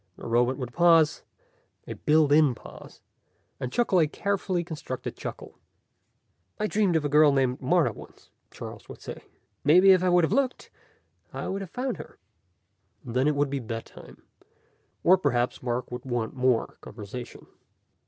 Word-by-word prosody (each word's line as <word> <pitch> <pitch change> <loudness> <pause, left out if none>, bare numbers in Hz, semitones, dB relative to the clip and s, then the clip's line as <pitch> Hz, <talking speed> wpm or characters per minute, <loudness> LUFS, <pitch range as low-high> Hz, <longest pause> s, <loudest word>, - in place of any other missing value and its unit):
The - - -11
robot 120 +2 +1
would 125 -3 -6
pause 165 -3 +4 0.6
a - - -6
built 155 -1 +2
in 145 -4 +5
pause - - -13 0.6
and 125 - -4
chuckle 230 -6 +2
a 160 - +4
carefully 190 +1 -2
constructed 155 -6 -6
chuckle. - - -8 1.0
"I 210 - 0
dreamed 205 -4 +1
of 155 -2 +1
a - - +3
girl 150 +1 +5
named 130 -2 0
Martha - - +2
once," - - -15 0.2
Charles - - -10
would - - -10
say. - - -9 0.4
"Maybe 180 +7 +6
if 185 -1 +5
I 185 - +3
would 175 -1 +4
have 160 - +1
looked, 265 -2 -1 0.6
I - - -5
would 195 +1 -3
have 190 - -7
found 255 +6 -3
her." - - -11 0.9
And 120 -1 -7
then 130 +3 +2
it 150 - +2
would 140 -1 0
be 140 - -1
bedtime. 115 -1 -9 0.8
Or 185 +2 +5
perhaps 125 -7 0
Mark 125 0 -3
would 125 0 -6
want 120 -3 -3
more 130 -3 0
conversation. 110 +3 -9
145 Hz, 165 wpm, -26 LUFS, 125-175 Hz, 1.0 s, Maybe